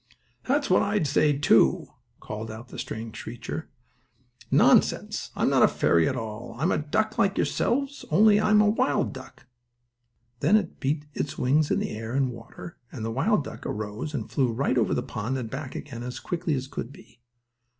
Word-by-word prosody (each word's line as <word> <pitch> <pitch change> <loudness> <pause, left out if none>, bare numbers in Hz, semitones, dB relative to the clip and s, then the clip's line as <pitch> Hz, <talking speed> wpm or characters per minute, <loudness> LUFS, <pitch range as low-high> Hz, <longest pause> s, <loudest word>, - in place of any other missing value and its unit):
"That's 285 +2 +1
what 185 - +4
I 205 -2 +1
say, 145 0 +2
too," 110 - +4 0.3
called 110 +1 -6
out 115 +3 -9
the - - -8
strange 110 0 -6
creature. 120 +7 -6 0.8
"Nonsense! - - +3
I'm - - +1
not - - +4
a - - +8
fairy 85 -1 +2
at - - -2
all. 115 -1 -6
I'm 170 - +1
a - - +1
duck 215 +9 -1
like 195 0 +2
yourselves, 275 +3 0
only 210 0 +5
I 215 - +1
am 210 0 +6
a 210 - +4
wild 175 -9 +1
duck." 130 +1 -12 0.9
Then 210 - +4 0.6
its 150 - -3
wings 145 +4 +2
beat - - +2
the - - -2
air 110 +2 -5
and 135 -2 +1
water, 120 +8 -10
and 110 -5 -5
the 115 - -2
wild 150 - +1
duck - - -9
arose 110 +8 -4
and 115 -6 -3
flew 130 -4 +1
right 130 +5 +1
over - - +1
the - - -1
pond 120 +6 -3
and 115 -4 -5
back 135 -1 -6
again, 120 -5 -7
as 125 +1 -5
quickly 165 -3 -2
as 130 0 -4
could 125 -2 -6
be. 120 - -17
135 Hz, 185 wpm, -26 LUFS, 115-170 Hz, 0.9 s, a